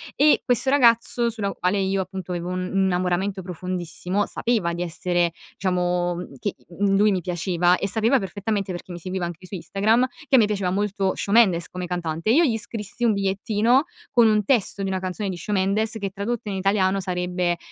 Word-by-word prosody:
E 295 +2 +4
questo 250 +1 +1
ragazzo, 235 -3 +3
sulla 215 -4 -3
quale 185 +2 0
io, 195 0 0
appunto, 190 -1 -5
avevo 175 -1 -3
un 185 0 -2
un 195 -1 +2
innamoramento 185 +2 0
profondissimo, 180 +2 -3
sapeva 220 -8 -1
di 175 +1 -3
essere, 175 0 0 0.2
diciamo 180 -1 0 0.2
che, - - -3 0.2
mhmm, 200 -1 +3
lui 210 +1 +4
mi 190 - +1
piaceva 180 0 +1
e 195 - -2
sapeva 230 +6 +3
perfettamente, 200 +3 -5 0.2
perché 180 +1 -7
mi 175 - -6
seguiva 185 +1 -3
anche 175 +1 -7
su 195 - -7
Instagram, 210 +8 +1 0.2
che 270 - +4
a - - +8
me 225 - +6
piaceva 200 -3 -1
molto 195 0 0
sciò 200 - -4
Mendes, 195 -7 +4
come 180 0 -5
cantante, 170 +1 -3
e - - +5
io 325 +6 +5
gli 230 -6 +1
scrissi 225 0 -5
un 230 -2 +4
bigliettino, 210 +6 +2 0.3
con 235 -2 +5
un 215 -1 +3
testo 210 -4 +1
di 195 - -1
una 190 -1 -1
canzone 185 +2 -3
di 185 - -3
sciò 190 +5 -4
Mendes 205 +3 +1
che 200 -2 -3
tradotto 210 +3 -3
in 195 - -3
italiano 195 0 +1
sarebbe, 180 -1 -1
195 Hz, 200 wpm, -23 LUFS, 180-215 Hz, 0.3 s, a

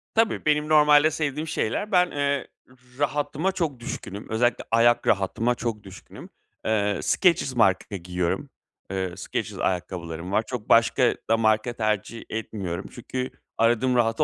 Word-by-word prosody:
Tabii 225 0 +1
benim 150 0 +2
normalde 150 0 +6
sevdiğim 150 0 -2
şeyler, 160 - -2
ben, 180 -2 +4
eee, 140 -1 -1 0.5
rahatıma 145 +5 0
çok 165 -9 -2
düşkünüm, 105 -4 -7
özellikle 120 +2 +1
ayak 120 +1 +4
rahatıma 110 +5 +1
çok 115 -3 -4
düşkünüm. 95 -1 -12 0.4
Eee, 105 -2 +1
Skechers 170 -8 +2
marka 100 -3 +2
giyiyorum. 90 0 -2 0.4
Eee, 95 -2 -2
Skechers - - -4
ayakkabılarım 90 -1 -3
var, 110 - +2
çok 120 -4 -6
başka 115 0 +4
da 115 - +4
marka 110 +2 +2
tercih 110 0 -2
etmiyorum. 100 -6 -4
Çünkü 130 0 -5 0.3
aradığım 120 +3 +2
rahatı 115 -2 +2
115 Hz, 135 wpm, -25 LUFS, 100-145 Hz, 0.5 s, normalde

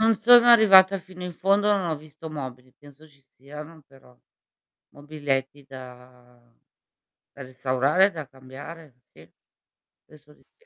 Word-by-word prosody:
Non 225 0 +2
sono 240 +3 +5
arrivata 195 -4 +6
fino 185 0 -14
in 180 0 -7
fondo, 200 +4 0
non 195 -4 -1
ho 160 - -3
visto 155 +2 -13
mobili, 130 -4 -10
penso 145 +3 -20
ci 145 -2 -28 0.2
siano 150 +4 -13
però 135 -2 -23 0.8
mobiletti 145 -2 -5
da 125 -2 -17 0.7
da 140 - -14
restaurare, 130 +7 0
e - - -7
da 155 -6 -9
cambiare. 135 +3 -14 0.2
Sì. - - -20 0.7
Penso 150 -1 -21
di - - -30
sì. 470 - -33
150 Hz, 140 wpm, -23 LUFS, 130-180 Hz, 0.8 s, arrivata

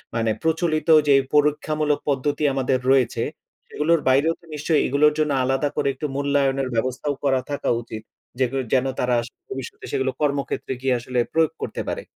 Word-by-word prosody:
মানে 115 -1 +1
প্রচলিত 160 -1 0 0.2
যে 140 - +6 0.2
পরীক্ষামূলক 150 0 +1
পদ্ধতি 145 +2 0
আমাদের 130 -1 +1
রয়েছে, 130 -4 +2 0.5
সেগুলোর 165 +2 +2
বাইরেও 140 +5 +3
তো - - -20
নিশ্চয়ই 150 +1 +1
এগুলোর 150 +3 +3
জন্য 150 -1 +1
আলাদা 135 +3 +1
করে - - 0
একটু 135 +3 -6
মূল্যায়নের 140 -1 +1
ব্যবস্থাও 130 +5 -1
করা 135 -2 +2
থাকা 145 - -2
উচিত। 110 -1 -8 0.4
যেগুলো 135 +1 +1
যেন 130 0 +3
তারা 125 -1 +1 0.3
ভবিষ্যতে 130 -1 -7
সেগুলো 130 0 0
কর্মক্ষেত্রে 140 -2 -1
গিয়ে 130 -2 +1
আসলে 125 +1 -2
প্রয়োগ 160 -1 +3
করতে - - -4
পারে। - - -4
140 Hz, 160 wpm, -23 LUFS, 130-150 Hz, 0.5 s, যে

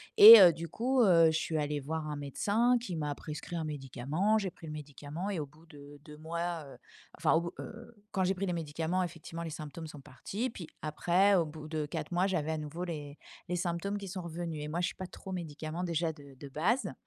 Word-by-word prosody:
et 220 +2 +13
heu, 175 -3 +9
du 165 +1 -7
coup, 250 - +1
heu, 170 -4 +6
je 160 0 +3
suis 160 -1 -2
allée 145 -1 -1
voir 155 +2 -3
un 150 - -3
médecin 205 - +1
qui 190 -8 -5
m'a 150 -2 -2
prescrit 155 +3 -6
un 160 - -2
médicament, 150 - -1
j'ai 195 -3 -1
pris 170 -2 -13
le 155 - -6
médicament 150 +5 -6
et 185 -6 -2
au 145 - -4
bout 155 +4 -20
de 145 -2 -13
2 150 -1 -11
mois, 170 +1 -3
heu, 135 - -12 0.4
enfin, 160 - +3 0.2
heu, 235 +1 -9 0.2
quand 190 -2 0
j'ai 185 - +2
pris 195 +1 -3
les 180 - -1
médicaments 165 +3 -1
effectivement, 165 -1 -7
les 165 - -4
symptômes 155 +1 -7
sont 150 -2 -10
partis 205 - -4
puis 170 -7 -8 0.2
après 175 +6 +3
au 170 -3 +3
bout 155 0 -9
de 155 -1 -2
4 150 - -5
mois, 180 +2 +2
j'avais 160 -5 -1
à 155 - -2
nouveau 155 +3 -5
les 150 -4 -6 0.3
les 180 - 0
symptômes 175 +3 -2
qui 200 -1 -7
sont 185 0 -5
revenus 165 -2 -5
et - - -4
moi, 170 +3 -2
je - - +1
suis - - -6
pas 185 - -6
trop 190 - -10
médicament 160 0 -5
déjà 170 -2 0
de 140 -3 -14
de 145 - -8
base 170 - 0
165 Hz, 230 wpm, -31 LUFS, 150-185 Hz, 0.4 s, et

